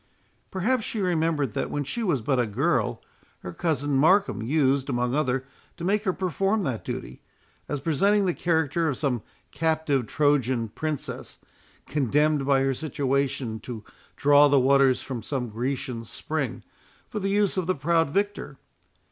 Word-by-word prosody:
Perhaps 220 +6 0
she 220 - -3
remembered, 160 - 0
that - - -2
when 145 - -2
she 235 - -4
was 170 - +1
but 130 +2 +1
a 120 - +1
girl, 105 - 0 0.4
her 90 - -7
cousin 145 - -1
Markham 185 - +3
used, 135 +2 +1
among 125 -1 0
others, 135 -3 0 0.3
to - - -7
make 205 +4 +1
her 190 - +3
perform 195 +3 0
that 130 -8 -3
duty, - - -6 0.5
as 145 - -2
presenting 195 +8 +2
the 180 - +1
character 160 -1 +1
of 135 - -2
some 130 -7 -1 0.3
captive 155 -6 0
Trojan 130 -6 +1
princess, 155 +5 -5 0.5
condemned 150 +1 +1
by 135 -1 +4
her 135 0 +1
situation 135 -4 -1
to 110 -1 -7 0.3
draw 145 +1 +6
the 140 -1 +4
waters 135 0 +4
from 125 -4 -5
some 125 +1 -3
Grecian 120 +1 -3
spring, - - -4 0.4
for 210 - -4
the 195 0 -1
use 205 -1 +2
of 185 -3 -1
the 185 - +1
proud 165 +2 +2
victor. 200 -5 -2
145 Hz, 155 wpm, -26 LUFS, 130-170 Hz, 0.5 s, draw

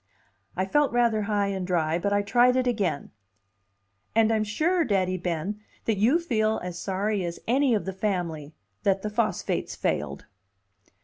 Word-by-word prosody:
I 185 - +1
felt 290 +9 +2
rather 235 -2 +2
high 205 -1 +1
and 190 -2 -3
dry, 165 -2 +1
but 200 +3 -1
I 205 0 +2
tried 245 +4 +4
it 255 0 +2
again: 200 - -1 1.0
"And 225 0 +4
I'm 215 -1 +2
sure, 325 - +1
Daddy 190 - +1
Ben, 180 +3 -3 0.3
that 220 -3 +1
you 240 +10 +4
feel 220 -10 0
as 180 -1 -5
sorry 195 +2 -1
as 170 -1 -4
any 260 0 +3
of 210 - -2
the 190 - -3
family 170 -7 -3 0.3
that 195 -1 +1
the 215 - -3
phosphates 215 -3 -1
failed." - - -2
205 Hz, 165 wpm, -26 LUFS, 185-230 Hz, 1.0 s, tried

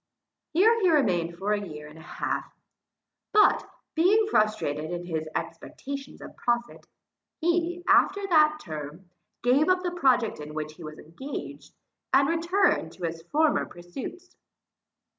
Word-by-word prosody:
Here 440 +8 +4
he 370 - +4
remained 175 - +1
for 200 +3 0
a 205 - -1
year 150 -6 -8
and 155 +1 -13
a - - -12
half; - - -4 0.8
but, 420 0 +4 0.2
being 395 +7 +4
frustrated 215 -8 +1
in 175 0 -4
his 160 -2 -3
expectations 275 0 -6
of - - -10
profit, 240 0 -2 0.5
he, 345 +1 0
after 400 0 +4
that 305 -4 +4
term, 155 - -8 0.3
gave 270 +7 +3
up 370 0 +2
the 355 - -1
project 255 - +2
in 150 0 -8
which 155 0 -4
he 165 - -13
was 155 0 -8
engaged, 260 - -8 0.4
and 275 +1 +5
returned 335 - +1
to 180 - -12
his 165 0 -3
former 310 0 +2
pursuits. 245 - -9
245 Hz, 140 wpm, -27 LUFS, -, 0.8 s, and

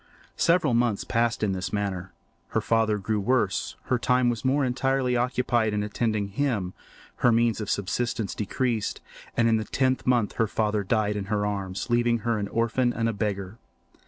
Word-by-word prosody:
Several 165 -6 +3
months 115 -3 +1
passed 115 -1 0
in 105 - +2
this 95 0 -3
manner. 100 -3 -3 0.4
Her - - 0
father 110 -2 +1
grew 105 +2 -1
worse; 125 +3 0
her 125 - 0
time 125 0 +3
was 115 -3 -5
more 135 +2 +2
entirely 130 0 +1
occupied 120 -3 +1
in 105 - 0
attending 105 -1 -1
him; 105 -6 -1 0.4
her 120 - +4
means 115 -1 +2
of 105 - -4
subsistence 110 +2 -1
decreased; 110 +1 -1 0.4
and 115 - +4
in 115 -1 +4
the 110 - -1
tenth 130 +3 0
month 120 -5 +2
her 115 - +2
father 105 -1 0
died 105 +1 +1
in 100 -1 -3
her 105 0 0
arms, 100 -1 -3
leaving 120 -1 +2
her 115 -2 +1
an 100 - -2
orphan 115 +3 +1
and 115 0 0
a - - -2
beggar. 100 0 -3
115 Hz, 180 wpm, -26 LUFS, 105-120 Hz, 0.4 s, her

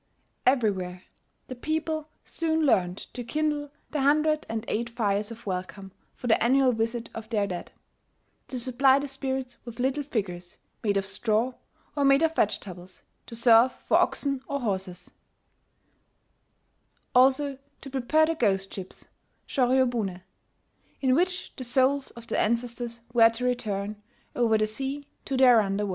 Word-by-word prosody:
Everywhere 190 -8 +1 0.4
the - - -6
people 310 +3 -2 0.2
soon 320 -1 0
learned 180 -8 +2 0.2
to 245 - -5
kindle 295 +3 -1 0.2
the 300 - -1
hundred 305 +2 +2
and 225 0 -3
eight 235 +2 -1
fires 210 -3 -1
of 230 0 -11
welcome 190 +1 -5 0.2
for - - -10
the 225 -2 +3
annual 260 +1 +4
visit 230 +1 -2
of 225 0 -8
their 210 -3 +1
dead, 180 -3 -6 0.8
to 255 - -4
supply 260 +2 +4
the 285 +1 -2
spirits 265 -2 -4
with 235 -1 -9
little 265 +3 +1
figures 185 -10 -4 0.3
made 205 -2 +1
of 195 - 0
straw, 220 +5 0 0.4
or 285 - +1
made 275 +2 +5
out 325 - +3
of - - -18
vegetables, 185 - -2 0.2
to 230 - -8
serve 235 +2 +5
for - - +1
oxen 275 -2 0
or 280 -1 -2
horses,* 190 -5 -4 2.0
also 270 +2 +4 0.2
to 275 - -8
prepare 275 +4 +3
the 330 - 0
ghost 195 -9 0
ships 190 -2 -8 0.4
(shoryobune), 245 -8 +1 0.8
in 260 -2 +2
which 360 +5 0
the 260 - -5
souls 265 +3 +2
of 235 - -10
the - - -1
ancestors 235 +1 -1
were 230 -2 +7
to 230 +2 -4
return, 210 -4 -2 0.3
over 230 -3 +3
the 215 - +2
sea, 270 +6 -4 0.2
to 270 - -2
their 250 -3 +7
under 200 0 -1
world. - - -4
240 Hz, 155 wpm, -27 LUFS, 210-275 Hz, 2.0 s, were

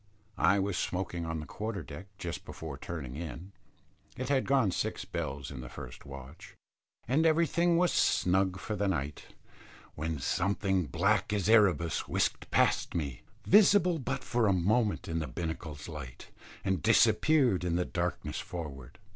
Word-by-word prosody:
I 95 +4 +4
was 100 -1 0
smoking 90 -2 -2
on 80 -1 -3
the - - -7
quarter 105 -1 -4
deck 80 +6 -9
just 85 -4 -5
before 80 -4 -7
turning 70 -3 -6
in, 85 +4 -7 0.7
it 130 0 -3
had 135 -2 +2
gone 130 -8 +3
six - - -2
bells 70 0 -4
in 65 -2 -7
the 60 - -8
first 65 +1 -10
watch, 70 +3 -11 0.5
and 135 +7 +3
everything 170 +1 +3
was 180 0 +3
snug 95 0 +2
for 105 +3 -4
the 100 0 0
night, 75 -6 -3 0.6
when 80 +1 -3
something 95 +3 0
black 60 - +1
as 105 -2 0
Erebus 95 -8 +3
whisked - - -1
past - - +2
me, 70 -7 -3 0.2
visible 190 -4 +5
but 135 +1 -3
for 120 -3 +1
a 100 - +4
moment 105 +5 +1
in 80 0 -1
the 80 - -3
binnacle's 80 -3 -5
light, 75 -6 -9 0.3
and 95 -4 0
disappeared 130 - +4
in 85 -1 0
the 90 0 +1
darkness 85 -3 -3
forward. 75 -8 -7
90 Hz, 155 wpm, -31 LUFS, 75-110 Hz, 0.7 s, visible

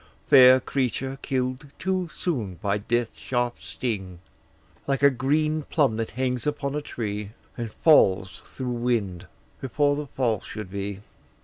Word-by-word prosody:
Fair 130 0 +8
creature, 135 0 -2
kill'd 130 +1 -2
too 185 -1 -1
soon 115 - -3
by 100 +4 -1
death's 120 +2 -1
sharp 120 -1 -2
sting! 95 -7 -4 0.7
Like 140 0 0
a 140 - +7
green 155 +5 +1
plum 140 -6 +1
that 115 -1 -2
hangs 125 -1 -1
upon 145 -2 -2
a 150 - -2
tree, 105 -5 -5 0.2
And 115 -2 -5
falls, 95 - +4
through 130 -2 -5
wind, 115 -7 -1 0.3
before 145 +2 +1
the 150 0 -4
fall 120 -7 0
should 105 -3 -7
he. 100 0 -5
125 Hz, 140 wpm, -25 LUFS, 105-140 Hz, 0.7 s, Fair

